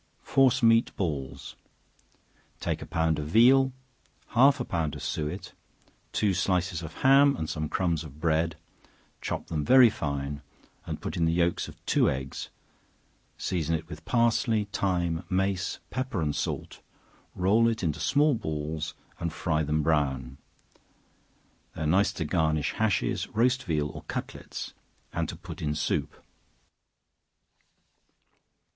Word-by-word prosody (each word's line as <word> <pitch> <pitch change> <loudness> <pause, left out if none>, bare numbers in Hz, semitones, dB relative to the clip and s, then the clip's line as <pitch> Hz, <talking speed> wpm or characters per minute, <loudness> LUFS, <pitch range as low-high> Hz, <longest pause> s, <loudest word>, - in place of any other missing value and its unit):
Force 135 -2 +3
Meat 115 0 +5
Balls. 70 -6 -4 1.0
Take - - -2
a - - -7
pound 80 -2 +1
of 75 - -4
veal, 130 - +5 0.6
half 135 +3 +5
a 125 - -2
pound 80 -4 -2
of 75 - -8
suet, 75 -1 -4 0.6
two 105 -3 +1
slices 90 -1 0
of 80 -2 -7
ham, 140 +1 +6
and 80 - -3
some 75 -1 -3
crumbs 85 -4 0
of 75 -1 -12
bread, 80 0 +1 0.7
chop - - -3
them 75 -2 -2
very 125 - +7
fine, 70 -3 -3 0.5
and - - -4
put - - -4
in 85 - +2
the 80 - +2
yelks 85 0 +1
of - - -11
two - - +3
eggs, 65 0 -4 0.9
season 80 -3 -1
it 80 0 -5
with 75 -2 -9
parsley, 115 0 +2
thyme, 85 -3 0
mace, 95 -1 0
pepper 130 -4 -2
and 75 -3 -1
salt, - - -4 0.5
roll 105 +6 +3
it 115 -3 -1
into 80 -1 -1
small 145 +2 +3
balls, 80 -6 -3 0.2
and 85 - -2
fry 80 -1 0
them 75 0 0
brown. 70 -4 0 1.4
They 80 - -4
are - - -1
nice 95 +6 +3
to 80 - -3
garnish 80 -2 +1
hashes, 110 -3 0
roast 125 +3 +1
veal 75 -4 0
or 75 0 -8
cutlets, - - -6 0.4
and 85 -1 -1
to - - -5
put 85 0 -9
in 75 -1 -1
soup. - - -2
85 Hz, 140 wpm, -28 LUFS, 75-110 Hz, 1.4 s, very